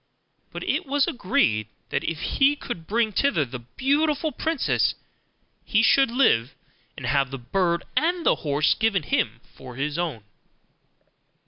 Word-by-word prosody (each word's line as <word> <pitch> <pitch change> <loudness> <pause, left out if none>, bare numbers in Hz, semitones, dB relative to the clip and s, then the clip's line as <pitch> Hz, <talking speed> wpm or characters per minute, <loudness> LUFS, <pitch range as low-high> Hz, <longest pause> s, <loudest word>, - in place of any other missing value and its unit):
But - - -6
it - - -1
was 280 0 +2
agreed, 185 - +1 0.2
that, - - -1
if 165 -1 -3 0.2
he 280 +1 +5
could 180 - -7
bring 225 0 +1
thither 205 - +1
the 125 0 -7 0.2
beautiful 300 +3 +1
princess, 320 +2 0 0.7
he 220 0 +2
should 270 +3 +5
live, 145 - +2 0.4
and 130 - -6
have 135 +1 +1
the 135 - -5
bird 170 +7 0
and 335 +5 +1
the - - +4
horse 150 0 +1
given 220 -6 0
him 115 -4 -1
for 130 -2 -11
his 145 +4 -2
own. 155 -11 -3
190 Hz, 145 wpm, -24 LUFS, -, 0.7 s, he